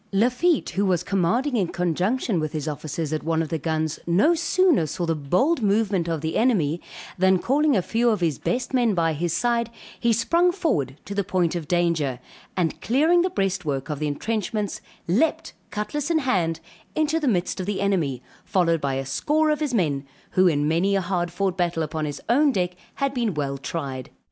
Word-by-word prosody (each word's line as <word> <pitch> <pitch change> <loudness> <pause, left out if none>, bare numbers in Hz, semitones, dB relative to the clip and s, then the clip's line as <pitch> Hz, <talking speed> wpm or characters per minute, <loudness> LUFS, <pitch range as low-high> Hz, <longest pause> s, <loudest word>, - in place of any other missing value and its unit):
Lafitte, 250 - +2
who 190 +3 0
was 180 -2 +1
commanding 200 +10 +1
in 195 -6 +1
conjunction 180 +5 0
with 155 -1 -3
his 155 -1 -3
officers, 155 +1 -3
at 155 - -1
one 165 0 0
of 155 - -6
the 160 - -2
guns, 160 0 -1
no 195 - +4
sooner 340 - +2
saw 175 +3 -3
the 165 - +1
bold 180 - +1
movement 200 -4 +1
of 165 -3 -2
the 160 0 -2
enemy, 175 - +2 0.4
than 190 0 +5
calling 280 +6 +2
a 185 - +1
few 235 +5 +1
of 215 - +1
his 165 -6 0
best 245 +1 -2
men 240 -5 +2
by 165 -2 +2
his 170 +3 -2
side, 235 +4 +1 0.3
he 235 - +2
sprung 335 +11 +3
forward 150 - -1
to 200 - -5
the 200 0 0
point 180 -3 0
of 165 -4 -4
danger, 165 -7 +1 0.4
and 170 -3 -1
clearing 315 +9 +3
the 370 - +1
breastwork 180 - -2
of 145 - -4
the 150 - -1
entrenchments, 210 +5 -2 0.3
leaped, 320 - +1 0.2
cutlass 210 +9 -3
in 335 - +3
hand, 180 - 0 0.4
into 310 +1 +1
the 300 - -1
midst 185 -7 0
of 185 - -3
the 205 -1 -1
enemy, 160 -11 0 0.2
followed 170 -4 +1
by 135 -1 -1
a 135 0 -3
score 305 - +1
of 300 - 0
his 295 -5 -1
men, 145 -9 +1 0.3
who 185 0 +4
in 145 -3 +2
many 175 +6 +2
a 195 - +2
hard 175 -1 -1
fought 185 +1 -1
battle 175 -3 0
upon 155 0 -3
his 145 -1 -5
own 280 +6 +4
deck, 180 -6 0 0.2
had 275 -1 -1
been 235 - -1
well 140 -2 -2
tried. 135 -2 -5
185 Hz, 200 wpm, -24 LUFS, 160-240 Hz, 0.4 s, than